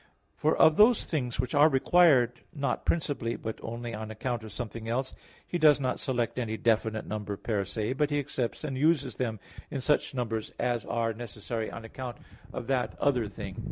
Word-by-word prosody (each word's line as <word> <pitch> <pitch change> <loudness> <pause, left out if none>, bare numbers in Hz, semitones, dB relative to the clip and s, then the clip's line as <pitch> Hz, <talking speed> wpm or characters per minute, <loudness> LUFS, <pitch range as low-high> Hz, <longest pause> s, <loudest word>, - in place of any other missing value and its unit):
For - - +1
of 160 - +6
those 220 +2 +6
things 125 -7 -2
which 125 +1 -1
are 145 +2 +7
required 135 -4 +4
not 140 -2 -1
principally, 145 -8 0
but 110 0 -5
only 115 +1 -5
on 110 0 -5
account 115 +2 -3
of 110 - -8
something 115 0 -5
else, 130 +3 -1 0.3
he 175 - -2
does 150 -2 +6
not 130 -2 -1
select 125 -3 -1
any 110 -2 -2
definite 110 -1 +1
number 105 -1 -4
per 105 -2 -1
se; 105 +5 -2
but 150 +2 +1
he 145 - 0
accepts 130 -3 -2
and 145 -3 -3
uses 145 0 +2
them 115 -4 -2 0.3
in 140 - -3
such 145 +1 +1
numbers 115 -3 -2
as 120 -3 0
are 115 -1 0
necessary 110 0 -5
on 115 - -8
account 125 +1 -6 0.3
of 120 - -5
that 130 -1 -1
other 125 -6 +2
thing. 100 - -7
120 Hz, 190 wpm, -29 LUFS, 110-140 Hz, 0.3 s, are